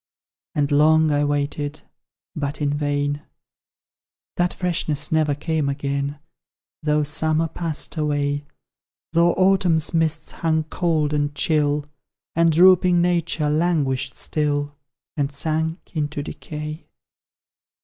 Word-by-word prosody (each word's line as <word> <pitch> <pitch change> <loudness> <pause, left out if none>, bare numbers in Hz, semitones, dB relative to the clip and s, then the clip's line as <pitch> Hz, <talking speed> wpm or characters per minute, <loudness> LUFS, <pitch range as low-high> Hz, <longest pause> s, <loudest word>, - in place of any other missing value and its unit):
And 145 -1 +1
long 155 +2 +4
I 145 0 +2
waited, 145 0 -2 0.5
but 145 -1 -3
in 145 -1 0
vain: 145 0 -1 1.2
That 175 0 +2
freshness 155 -5 -1
never 155 -2 +2
came 155 -1 -1
again, 140 +1 -2 0.6
Though 150 0 +2
Summer 155 +2 +1
passed 160 -1 -3
away, 145 -1 -1 0.7
Though 170 +1 +4
Autumn's 185 -4 +2
mists 160 -1 0
hung 160 -1 0
cold 155 -2 0
and 145 -1 0
chill. 150 -1 +1 0.5
And 165 0 +4
drooping 180 +1 +6
nature 170 -3 +1
languished 150 -5 0
still, 145 -1 -1 0.4
And 140 -1 0
sank 160 +3 -1 0.2
into 150 -1 -2
decay. 150 +1 -7
150 Hz, 110 wpm, -22 LUFS, 145-160 Hz, 1.2 s, drooping